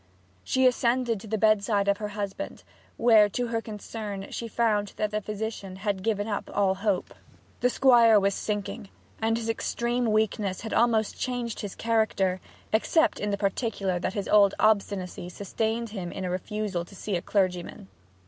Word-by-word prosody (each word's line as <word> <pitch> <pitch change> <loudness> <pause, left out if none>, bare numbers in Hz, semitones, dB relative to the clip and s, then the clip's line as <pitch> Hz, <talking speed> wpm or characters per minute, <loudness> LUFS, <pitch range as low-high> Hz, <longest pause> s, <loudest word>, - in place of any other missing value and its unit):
She 260 0 +2
ascended 245 -2 +2
to 215 - -11
the 220 +1 -1
bedside 205 -1 +2
of 200 0 +3
her 210 - -3
husband, 205 +8 -5 0.3
where 220 -3 +6
to 245 +3 -2
her 230 -1 -1
concern 210 -2 -6
she 235 - -4
found 210 -3 0
that 210 -1 -1
the 215 0 -1
physician 210 -2 -5
had 195 -1 -2
given 205 0 -1
up 205 -2 -3
all 195 -2 +3
hope. 195 -1 -1 0.5
The 250 - +3
Squire 235 -4 +6
was 200 0 +1
sinking, 205 0 -4 0.3
and 225 +1 +2
his 230 -1 -4
extreme 235 +1 -1
weakness 215 -3 0
had 220 - -5
almost 225 -2 +2
changed 245 -3 -3
his 205 -2 -5
character, 220 -5 +1 0.3
except 320 +8 +2
in 205 - -2
the 200 - 0
particular 195 -2 -1
that 185 - -3
his 200 -2 -2
old 200 -2 +5
obstinacy 200 -4 +1
sustained 220 +5 -2
him 190 -5 -5
in 190 - -5
a 180 - -2
refusal 195 -1 -3
to 185 +3 -14
see 200 +1 -3
a 175 - -1
clergyman. 185 0 -1
210 Hz, 170 wpm, -27 LUFS, 195-225 Hz, 0.5 s, where